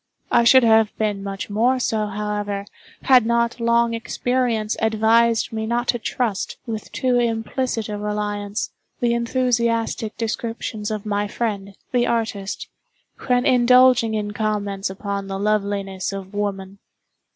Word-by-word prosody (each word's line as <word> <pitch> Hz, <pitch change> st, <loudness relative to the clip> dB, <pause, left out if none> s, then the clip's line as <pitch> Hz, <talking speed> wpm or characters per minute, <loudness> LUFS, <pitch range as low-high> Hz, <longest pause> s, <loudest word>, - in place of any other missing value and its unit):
I 235 Hz, -, +4 dB
should 260 Hz, +2 st, +7 dB
have 220 Hz, -2 st, +4 dB
been 210 Hz, -2 st, -1 dB
much 195 Hz, 0 st, -5 dB
more 235 Hz, +5 st, +2 dB
so, 220 Hz, -3 st, 0 dB
however, 205 Hz, -1 st, -3 dB, 0.4 s
had 255 Hz, -3 st, +6 dB
not 235 Hz, +1 st, 0 dB
long 235 Hz, 0 st, +2 dB
experience 230 Hz, -1 st, -1 dB
advised 225 Hz, +1 st, +3 dB
me 220 Hz, 0 st, -2 dB
not 240 Hz, +1 st, -1 dB
to 240 Hz, -, +2 dB
trust, 225 Hz, -3 st, -2 dB
with 220 Hz, -2 st, -6 dB
too 250 Hz, -1 st, +1 dB
implicit 230 Hz, 0 st, -1 dB
a 210 Hz, -1 st, -4 dB
reliance, 210 Hz, 0 st, -3 dB, 0.3 s
the 240 Hz, -1 st, +2 dB
enthusiastic 235 Hz, -2 st, 0 dB
descriptions 225 Hz, -1 st, -3 dB
of 215 Hz, -1 st, -4 dB
my 205 Hz, 0 st, -1 dB
friend, 200 Hz, -3 st, -3 dB
the 245 Hz, -1 st, +2 dB
artist, 220 Hz, -4 st, -2 dB, 0.6 s
when 250 Hz, 0 st, +2 dB
indulging 250 Hz, -3 st, +5 dB
in 205 Hz, -1 st, -2 dB
comments 205 Hz, -2 st, -2 dB
upon 200 Hz, 0 st, -4 dB
the 195 Hz, 0 st, -4 dB
loveliness 200 Hz, -2 st, -1 dB
of 195 Hz, 0 st, -7 dB
woman. 200 Hz, -1 st, -3 dB
220 Hz, 135 wpm, -22 LUFS, 205-235 Hz, 0.6 s, should